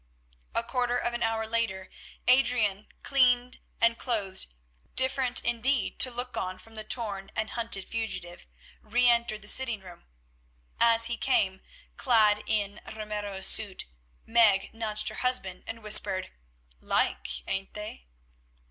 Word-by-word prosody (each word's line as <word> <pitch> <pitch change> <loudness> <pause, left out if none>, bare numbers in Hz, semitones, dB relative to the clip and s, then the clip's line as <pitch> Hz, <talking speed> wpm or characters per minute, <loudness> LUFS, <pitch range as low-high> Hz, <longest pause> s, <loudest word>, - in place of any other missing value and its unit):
A - - +2
quarter 245 0 -1
of 240 - -2
an 240 - -4
hour 225 -1 -1
later 220 -4 -2 0.4
Adrian, 240 -6 +3 0.2
cleaned 250 -2 +2 0.2
and 230 0 +2
clothed, 205 -7 -2 0.5
different 260 -1 +3
indeed 240 +3 0
to 255 - +6
look 245 +1 -5
on 185 0 -4
from 225 - -16
the 215 -1 -6
torn 210 -4 -3
and 220 0 -2
hunted 225 -5 +1
fugitive, 185 - -5 0.3
re 245 +3 +1
entered 235 -3 +1
the - - -11
sitting 240 -3 0
room. 180 -2 -14 0.7
As 230 -1 +6
he 235 0 -1
came, 190 -7 0 0.4
clad 215 -4 +3
in 205 -2 -2
Ramiro's 210 -3 -5
suit, 205 -4 +2 0.4
Meg 220 -4 +3
nudged 215 -2 -1
her 215 - -9
husband 220 -8 -1
and 225 -1 -8
whispered, 210 -3 +4 0.5
"Like, - - -1
ain't 195 0 -4
they?" 210 - -8
225 Hz, 135 wpm, -27 LUFS, 205-240 Hz, 0.7 s, to